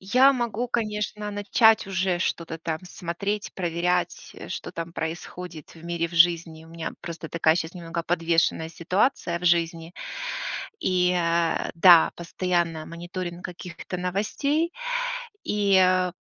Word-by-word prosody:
Я 255 Hz, +8 st, +5 dB
могу, 240 Hz, 0 st, -2 dB
конечно, 210 Hz, -2 st, -2 dB
начать 210 Hz, +2 st, +4 dB
уже 190 Hz, -2 st, 0 dB
что-то 165 Hz, -2 st, -2 dB
там 160 Hz, -1 st, -3 dB
смотреть, 190 Hz, +4 st, -4 dB
проверять, 175 Hz, 0 st, -1 dB
что -, -, -5 dB
там 165 Hz, 0 st, -5 dB
происходит 165 Hz, 0 st, -6 dB
в 165 Hz, -, -14 dB
мире, 170 Hz, -1 st, -1 dB
в 170 Hz, -, -11 dB
жизни. 165 Hz, -1 st, +3 dB
У 160 Hz, -, -16 dB
меня 165 Hz, 0 st, -5 dB
просто 165 Hz, -1 st, -7 dB
такая 160 Hz, -1 st, +3 dB
сейчас 160 Hz, -1 st, -3 dB
немного 170 Hz, -1 st, -4 dB
подвешенная 165 Hz, -1 st, +1 dB
ситуация 180 Hz, +1 st, 0 dB
в 180 Hz, -, -9 dB
жизни 170 Hz, 0 st, +1 dB, 0.9 s
и, 180 Hz, -1 st, +2 dB
э, 170 Hz, -1 st, +1 dB
да, 170 Hz, -1 st, +7 dB
постоянно 170 Hz, -2 st, -1 dB
мониторинг 175 Hz, +1 st, -6 dB
каких-то 180 Hz, 0 st, -7 dB
новостей, 280 Hz, -, 0 dB, 0.7 s
и 185 Hz, -3 st, +3 dB
175 Hz, 125 wpm, -25 LUFS, 165-190 Hz, 0.9 s, да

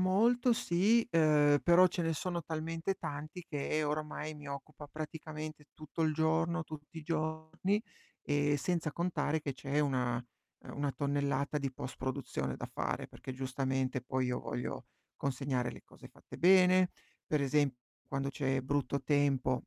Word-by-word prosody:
molto, 235 Hz, +7 st, +4 dB
sì, 220 Hz, +3 st, +3 dB
uhm, 150 Hz, -3 st, +5 dB
però 175 Hz, +1 st, +7 dB
ce 180 Hz, 0 st, -2 dB
ne 165 Hz, 0 st, +1 dB
sono 170 Hz, +2 st, -2 dB
talmente 165 Hz, +3 st, -2 dB
tanti 155 Hz, +3 st, -6 dB
che 150 Hz, +1 st, -1 dB
ormai 150 Hz, +1 st, -3 dB
mi 145 Hz, -1 st, -9 dB
occupa 145 Hz, +1 st, -8 dB
praticamente 155 Hz, 0 st, -6 dB
tutto 155 Hz, +2 st, -4 dB
il 155 Hz, -1 st, +3 dB
giorno, 160 Hz, +2 st, +1 dB
tutti 155 Hz, +1 st, -9 dB
i -, -, -7 dB
giorni. 160 Hz, +5 st, -1 dB, 0.4 s
E, 145 Hz, 0 st, +2 dB
senza 165 Hz, +1 st, 0 dB
contare 165 Hz, -2 st, 0 dB
che 145 Hz, -2 st, -3 dB
c'è 140 Hz, +2 st, -2 dB
una 130 Hz, -4 st, +1 dB
uhm, 120 Hz, -1 st, -11 dB
una 145 Hz, 0 st, 0 dB
tonnellata 140 Hz, +1 st, 0 dB
di 140 Hz, -2 st, -1 dB
postproduzione 130 Hz, 0 st, -3 dB
da -, -, -5 dB
fare, -, -, -3 dB
perché 130 Hz, -, -8 dB
giustamente 130 Hz, 0 st, -1 dB
poi 130 Hz, +1 st, 0 dB
io 125 Hz, 0 st, -1 dB
voglio 125 Hz, -, -4 dB, 0.3 s
consegnare 130 Hz, -2 st, -1 dB
le -, -, -11 dB
cose -, -, -14 dB
fatte -, -, -13 dB
bene, 185 Hz, 0 st, +6 dB, 0.4 s
per 150 Hz, -, +2 dB
esemp 140 Hz, 0 st, +2 dB, 0.3 s
quando 135 Hz, 0 st, -1 dB
c'è 135 Hz, -2 st, 0 dB
brutto 140 Hz, +1 st, 0 dB
tempo 140 Hz, -3 st, +2 dB
150 Hz, 150 wpm, -33 LUFS, 140-165 Hz, 0.4 s, però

